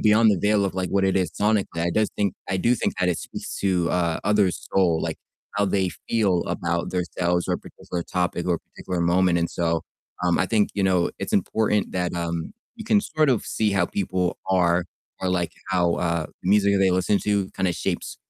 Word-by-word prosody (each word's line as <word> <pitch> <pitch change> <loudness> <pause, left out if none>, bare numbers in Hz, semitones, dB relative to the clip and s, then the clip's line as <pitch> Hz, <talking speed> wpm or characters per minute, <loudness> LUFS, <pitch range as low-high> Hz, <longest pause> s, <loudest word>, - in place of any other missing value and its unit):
beyond 110 +1 +5
the - - +1
veil 105 +2 +2
of 95 - -2
like 95 -1 -1
what 100 -1 +2
it 95 - +2
is 90 -3 +1
sonically, 105 -4 0
I 85 - +1
does 110 +4 +1
think 100 -3 0
I 95 - 0
do 120 +7 +3
think 115 - -1
that 90 - +2
it 90 - +1
speaks - - -7
to, 90 -4 +1
uh, 85 -2 0
others' 105 -4 +1
soul, 85 -4 +3
like - - -3 0.4
how 100 0 +2
they 95 -1 +1 0.2
feel 100 -7 +2
about 85 0 -1
their 90 -1 0
selves, 90 0 +1
or - - 0
a - - -3
particular 85 - -6
topic, 90 0 -2
or 90 - +1
a - - -3
particular 90 +2 -6
moment, 85 +1 +3
and, 85 0 0
so, 85 -1 -1 0.4
um, 90 -1 +3
I 95 - +1
think, 105 0 +2
you 100 - 0
know, 90 -2 +2
it's - - -4
important 105 -2 +1
that, 90 -2 -1
um, 85 -1 -3 0.2
you 225 -2 -9
can 210 -2 +4
sort 155 -6 +1
of 125 -5 +2
see 110 -2 0
how 95 -3 +2
people 90 -2 -1
are 90 -2 +3 0.4
or 95 - -1
like 90 -2 0 0.2
how, 85 -2 +2
uh, 85 -3 -1 0.2
the 90 - -3
music 100 0 +4
that 100 - +3
they 95 -1 +4
listen 95 +2 +2
to 100 -2 0
kind 95 - 0
of 85 - -1
shapes - - -3
95 Hz, 225 wpm, -24 LUFS, 85-100 Hz, 0.4 s, beyond